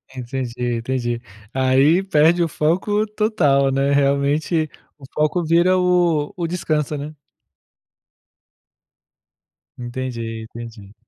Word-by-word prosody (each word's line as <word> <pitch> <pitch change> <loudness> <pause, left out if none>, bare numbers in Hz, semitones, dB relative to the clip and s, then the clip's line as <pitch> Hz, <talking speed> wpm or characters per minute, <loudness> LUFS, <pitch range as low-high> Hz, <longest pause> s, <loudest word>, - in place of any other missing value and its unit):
Entendi, 125 -1 -3
entendi. 120 0 -2 0.3
Aí 135 +6 +3
perde 170 -2 +3
o 170 - +2
foco 185 +8 0
total, 145 -12 +2
né, 135 +1 +1
realmente 145 +3 +1 0.3
o 140 - -20
foco 155 +3 0
vira 170 +3 +3
o 175 -5 +2
o 170 -2 -2
descanso, 155 -4 -1
né. 150 +2 -6 2.7
Entendi, 120 -2 -5
entendi. 110 -3 -10
145 Hz, 100 wpm, -20 LUFS, 130-170 Hz, 2.7 s, Aí